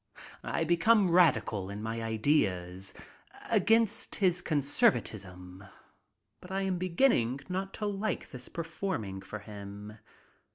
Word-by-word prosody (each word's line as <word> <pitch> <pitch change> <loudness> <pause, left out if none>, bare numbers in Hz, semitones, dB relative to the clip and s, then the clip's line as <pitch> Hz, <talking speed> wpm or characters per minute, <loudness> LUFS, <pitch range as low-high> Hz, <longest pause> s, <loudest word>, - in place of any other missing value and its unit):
I - - -1
become 175 +4 +4
radical 115 - +3
in 100 +1 -6
my 115 +1 -3
ideas. 100 - 0 0.6
Against 225 -1 +2
his 180 -3 +2
conservatism. 105 - 0 0.8
But 180 - -13
I 190 +1 -1
am 185 -2 -1
beginning 170 - +2
not 190 +1 -2
to 210 - -3
like 205 +1 -2
this 125 -1 -9
performing 160 - -4
for 95 +2 -7
him. 105 0 -9
140 Hz, 115 wpm, -30 LUFS, -, 0.8 s, become